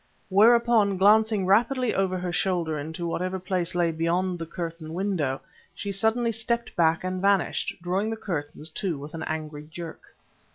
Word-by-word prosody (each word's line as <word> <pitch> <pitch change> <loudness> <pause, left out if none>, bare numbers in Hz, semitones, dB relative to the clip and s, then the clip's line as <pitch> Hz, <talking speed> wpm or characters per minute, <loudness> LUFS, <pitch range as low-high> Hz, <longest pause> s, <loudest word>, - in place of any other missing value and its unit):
Whereupon, 220 0 +5
glancing 210 +1 +4
rapidly 235 +5 +3
over 190 -1 0
her 180 -1 -3
shoulder 170 -5 0
into 160 +4 -5
whatever 185 +2 -2
place 185 -2 -2
lay 170 -1 +2
beyond 175 +3 0
the 165 - -5
curtained 170 +2 -3
doorway, 135 -3 0 0.4
she 200 - -4
suddenly 225 +4 +1
stepped 235 +1 -1
back 165 -1 +3
and 185 0 -2
vanished, 195 -2 +1
drawing 190 +4 0
the 225 - -3
curtains 155 -5 -4
to 175 -3 -2
with 145 +3 -9
an 165 - -5
angry 155 -1 -5
jerk. 165 0 -9
185 Hz, 160 wpm, -26 LUFS, 165-205 Hz, 0.4 s, Whereupon